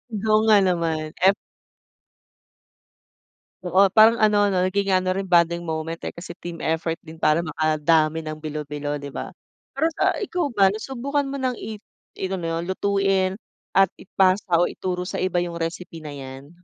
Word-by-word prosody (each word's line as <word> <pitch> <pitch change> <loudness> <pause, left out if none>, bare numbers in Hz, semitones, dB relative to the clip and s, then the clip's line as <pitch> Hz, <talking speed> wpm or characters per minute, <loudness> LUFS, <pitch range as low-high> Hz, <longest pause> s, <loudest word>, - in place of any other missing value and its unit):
Oo 215 +1 +2
nga 215 -1 +7
naman, 165 -4 -1
ef 195 +2 +5 2.3
Oo, 190 +3 +4
parang 220 +3 +5
ano 205 -1 +4
'no, 180 - +2
naging 200 0 0
ano 185 0 +2
rin 195 - -2
bonding 170 -1 +2
moment. 160 +1 -3
Eh, - - -4
kasi 170 0 -9
team 170 -1 -8
effort 160 +1 -1
din 160 0 -12
para 160 +1 +2
makadami 155 0 +1
ng 155 -1 -6
bilo-bilo, 150 -1 -5
'di 140 - -6
ba? - - -7 0.4
Pero 315 +4 +1
sa - - +3
ikaw 360 -5 -1
ba, 195 -2 +5
nasubukan 270 +6 -2
mo 275 0 -5
ng 255 -2 -1
i 215 -1 -7 0.4
ito 190 0 -3
na 165 -1 -2
yun, 170 - -3
lutuin 195 -1 +1 0.5
at 195 -2 +6
ipasa 185 -2 +2
o 175 - +4
ituro 180 -1 -4
sa 180 - -4
iba 185 -1 0
yung 170 -1 -4
recipe 165 0 -5
na 150 -2 -7
'yan? 135 +1 -9
175 Hz, 165 wpm, -23 LUFS, 160-200 Hz, 2.3 s, nga